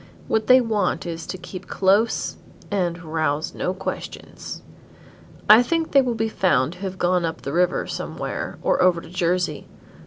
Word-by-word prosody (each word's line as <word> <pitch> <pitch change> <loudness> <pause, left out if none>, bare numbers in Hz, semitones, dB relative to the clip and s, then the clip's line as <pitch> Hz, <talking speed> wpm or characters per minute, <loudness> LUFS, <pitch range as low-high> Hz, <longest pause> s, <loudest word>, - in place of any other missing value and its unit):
What 220 -1 0
they 255 0 +7
want 215 -5 0
is 165 -1 -5
too 185 - -5
keep 185 +1 -9
close 200 +4 +2 0.4
and 180 -3 -1
rouse 155 -1 -1
no 180 - -2
questions. 190 +1 -7 0.8
I 215 +3 +9
think 325 +6 -1
they 275 - +6
will 245 -3 -1
be 225 0 0
found 170 -9 +1
to - - -15
have 190 -1 -5
gone 180 0 +1
up 165 0 -3
the 140 - -4
river 180 +1 +2
somewhere, - - -5
or - - +2
over 180 -2 +4
to - - -12
Jersey. 175 -4 -1
185 Hz, 165 wpm, -23 LUFS, 170-215 Hz, 0.8 s, I